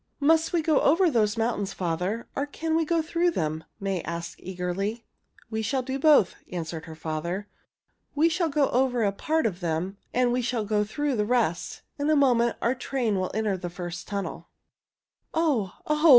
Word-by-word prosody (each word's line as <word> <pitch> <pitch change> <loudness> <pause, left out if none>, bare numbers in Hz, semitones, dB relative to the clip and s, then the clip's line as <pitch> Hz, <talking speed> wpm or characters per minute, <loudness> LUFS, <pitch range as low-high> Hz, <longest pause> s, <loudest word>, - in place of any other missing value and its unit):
"Must 320 +2 +4
we 340 -2 +1
go 310 -2 +3
over 335 +4 +4
those 215 -3 +2
mountains, 225 -3 0
father, 180 +6 -2
or 280 +1 -1
can 320 +2 -2
we 325 0 +2
go 330 0 +1
through 340 +2 +1
them?" 160 - -2
May 195 -3 -1
asked 170 +1 -5
eagerly. 190 +5 -3 0.5
"We 220 0 -1
shall 260 +4 0
do 265 +1 -3
both," 285 - +5 0.2
answered 165 -2 -4
her 160 - -9
father. 165 +5 -3 0.7
"We 310 +3 +5
shall 335 0 +1
go 285 -1 +2
over 250 -2 +2
a 200 - +3
part 315 +10 0
of 185 -5 -1
them 175 +3 -2
and 250 -1 +2
we 250 +1 +1
shall 235 -2 -1
go 210 0 +2
through 270 +5 -1
the 210 - +1
rest. 230 -9 0 0.2
In 290 +1 +1
a 310 - +5
moment 240 -5 +3
our 235 - +3
train 250 -5 -1
will 185 - -1
enter 215 -3 +1
the 175 -1 -5
first 175 0 -6
tunnel." 200 -1 -4 0.9
"Oh! 280 - +1
Oh! 305 +2 +3
225 Hz, 185 wpm, -27 LUFS, 185-285 Hz, 0.9 s, both